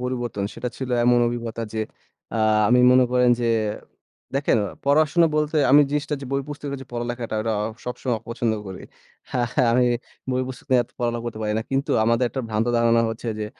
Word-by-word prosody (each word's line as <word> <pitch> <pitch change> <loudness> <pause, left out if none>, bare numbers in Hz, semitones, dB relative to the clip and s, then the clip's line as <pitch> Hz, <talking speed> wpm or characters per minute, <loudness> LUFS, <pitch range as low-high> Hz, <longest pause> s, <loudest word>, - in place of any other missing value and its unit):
পরিবর্তন, 120 -5 -3
সেটা 120 +2 -4
ছিল 130 -1 -5
এমন 120 0 +5
অভিজ্ঞতা 115 -1 -4
যে 110 - -1 0.5
আ - - 0 0.3
আমি 125 +1 +5
মনে 130 0 +6
করেন 125 -1 +4
যে 120 - +1 0.9
দেখেন 140 -4 +2 0.3
পড়াশোনা 155 +4 +4
বলতে 150 +1 0
আমি 145 +2 +8
জিনিসটা 150 0 -1
যে 140 - -7
বই 140 0 0
পুস্তক 145 0 -6
এর - - -6
যে 135 - -13
পড়ালেখাটা, 120 -1 -4
এটা 110 0 -1 0.3
সবসময় 125 0 -2
অপছন্দ 115 0 -2
করি। 95 -1 -8 0.9
আমি 125 0 +4 0.4
বই 130 0 0
পুস্তক 130 - -9
নিয়ে 130 -1 +5
এত - - -29
পড়ালেখা 120 -1 -1
করতে 115 -2 -5
পারি 105 0 -1
না। 110 - -2
কিন্তু 135 +1 -1
আমাদের 115 +2 +2
একটা 130 - -4
ভ্রান্ত 110 +1 0
ধারণা 115 0 +3
হচ্ছে 115 +1 -6
যে 105 - -2
120 Hz, 185 wpm, -23 LUFS, 115-135 Hz, 0.9 s, আমি